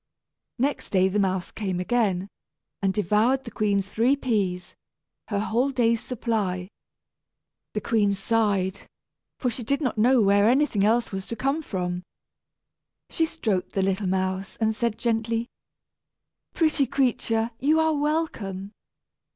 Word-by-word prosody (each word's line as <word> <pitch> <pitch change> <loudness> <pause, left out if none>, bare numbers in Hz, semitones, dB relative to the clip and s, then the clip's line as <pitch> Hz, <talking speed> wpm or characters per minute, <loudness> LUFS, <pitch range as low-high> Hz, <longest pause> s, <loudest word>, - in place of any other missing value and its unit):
Next 275 +3 -1
day 190 -1 +3
the 205 +2 0
mouse 190 -2 0
came 190 -4 -3
again, 195 -2 0 0.5
and 195 -1 +2
devoured 215 +7 +2
the 235 - -8
queen's 200 -2 0
three 235 +7 +2
peas, 195 -9 -1 0.5
her 205 - -2
whole 235 +6 +1
day's 235 -4 +1
supply. 210 -7 -2 1.1
The 210 - 0
queen 205 -2 +2
sighed, 200 -2 0 0.5
for 250 - -1
she 240 - -6
did 280 +5 0
not 255 -7 -1
know 250 +3 +5
where 200 0 +4
anything 255 -6 +2
else 230 +3 +2
was 190 -1 -5
to 230 - -4
come 275 +7 0
from. 180 - -3 1.1
She 325 - +1
stroked 215 - -2
the 195 - +1
little 195 +1 0
mouse, 190 +1 -1
and 220 -1 0
said 235 -1 -1
gently, 230 +1 -1 1.0
"Pretty 310 -4 +2
creature, 235 -3 0
you 305 +4 +3
are 320 0 +3
welcome." 285 - -2
220 Hz, 135 wpm, -25 LUFS, 195-250 Hz, 1.1 s, know